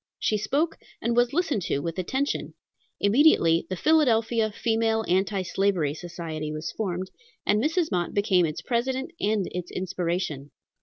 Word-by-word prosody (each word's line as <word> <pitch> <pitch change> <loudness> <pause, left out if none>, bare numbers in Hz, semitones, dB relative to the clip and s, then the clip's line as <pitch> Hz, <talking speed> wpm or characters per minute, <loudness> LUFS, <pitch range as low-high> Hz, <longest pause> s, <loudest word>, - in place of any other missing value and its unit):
She 215 - 0
spoke, 290 +10 0 0.2
and 235 +1 0
was 240 0 +3
listened 315 - 0
to - - 0
with 165 +5 -3
attention. 265 +10 -2 0.4
Immediately 200 - +4
the 185 - -2
Philadelphia 230 - +3
Female 225 0 0
Anti 190 +2 +1
Slavery 185 -6 +1
Society 160 -2 -5
was 155 +1 -4
formed, 185 -3 -3 0.3
and 210 +2 +2
Mrs. 320 +1 +1
Mott 175 -3 -1
became 200 -3 +3
its 160 +2 -6
president 260 - -1
and 205 -2 +1
its 180 -1 -5
inspiration. 175 -6 -3
200 Hz, 145 wpm, -26 LUFS, 175-235 Hz, 0.4 s, Immediately